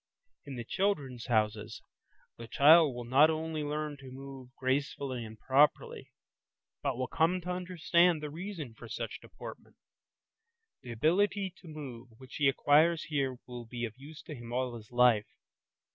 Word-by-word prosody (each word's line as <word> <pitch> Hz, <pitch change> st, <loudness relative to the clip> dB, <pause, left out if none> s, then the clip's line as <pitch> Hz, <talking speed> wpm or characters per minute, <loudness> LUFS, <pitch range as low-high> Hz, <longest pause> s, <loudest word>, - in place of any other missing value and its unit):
In 140 Hz, -, -6 dB
the 120 Hz, -, -5 dB
"Children's 140 Hz, -, -1 dB
Houses" 110 Hz, -2 st, 0 dB, 0.5 s
the 115 Hz, -, -9 dB
child 150 Hz, +1 st, +6 dB
will 120 Hz, -, -5 dB
not 135 Hz, +6 st, +5 dB
only 160 Hz, 0 st, -2 dB
learn 150 Hz, 0 st, -3 dB
to 135 Hz, -1 st, -11 dB
move 135 Hz, -1 st, -10 dB
gracefully 130 Hz, -1 st, -2 dB
and 110 Hz, 0 st, -10 dB
properly, 140 Hz, +3 st, +2 dB, 0.7 s
but 135 Hz, -4 st, -1 dB
will 130 Hz, -, -1 dB
come 165 Hz, +7 st, +1 dB
to 180 Hz, +1 st, -4 dB
understand 180 Hz, -1 st, +2 dB
the 150 Hz, -1 st, -6 dB
reason 165 Hz, -, -6 dB
for -, -, -12 dB
such -, -, -5 dB
deportment. -, -, -11 dB, 1.1 s
The 120 Hz, -, -8 dB
ability 190 Hz, -, +1 dB
to 180 Hz, -, -15 dB
move 135 Hz, -6 st, -8 dB
which 130 Hz, 0 st, -10 dB
he 145 Hz, -, +3 dB
acquires 155 Hz, +5 st, +4 dB
here 135 Hz, -4 st, -1 dB
will 120 Hz, -2 st, -8 dB
be 120 Hz, 0 st, -4 dB
of 110 Hz, -, -7 dB
use 145 Hz, +4 st, -12 dB
to 155 Hz, -, -8 dB
him 120 Hz, -3 st, -9 dB
all 125 Hz, 0 st, -1 dB
his 110 Hz, -1 st, -11 dB
life. 120 Hz, -4 st, +4 dB
140 Hz, 160 wpm, -31 LUFS, 120-160 Hz, 1.1 s, child